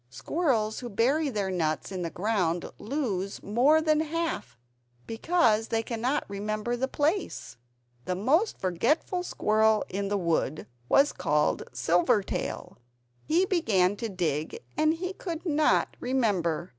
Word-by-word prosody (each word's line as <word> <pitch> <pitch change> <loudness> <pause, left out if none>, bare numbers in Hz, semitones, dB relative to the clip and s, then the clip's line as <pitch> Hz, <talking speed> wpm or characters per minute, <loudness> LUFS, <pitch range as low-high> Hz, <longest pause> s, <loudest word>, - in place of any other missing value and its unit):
Squirrels 220 - -1
who 245 - -6
bury 275 +9 +1
their 205 -6 -2
nuts 160 -3 -1
in 185 -2 -4
the 170 - -2
ground 180 -3 0
lose 210 -7 -3
more 255 +10 +4
than 310 -1 +3
half, 320 - -3 0.5
because 225 -3 +2
they 225 0 0
cannot 245 +5 -1
remember 215 +4 -3
the 260 +2 -1
place. 310 +8 -2 0.5
The 180 - -1
most 295 - +2
forgetful 235 - 0
squirrel 220 -9 +2
in 200 +1 -2
the 205 +1 0
wood 165 -4 -1 0.2
was 280 +1 +4
called 150 -4 +1
Silvertail. 175 - 0 0.5
He 345 +4 +3
began 205 - +2
to 230 0 -4
dig, 160 -5 -2
and 310 +1 +2
he 365 +3 -4
could 345 -3 -6
not 305 -2 +2
remember. 195 -10 0
220 Hz, 130 wpm, -28 LUFS, 185-300 Hz, 0.5 s, more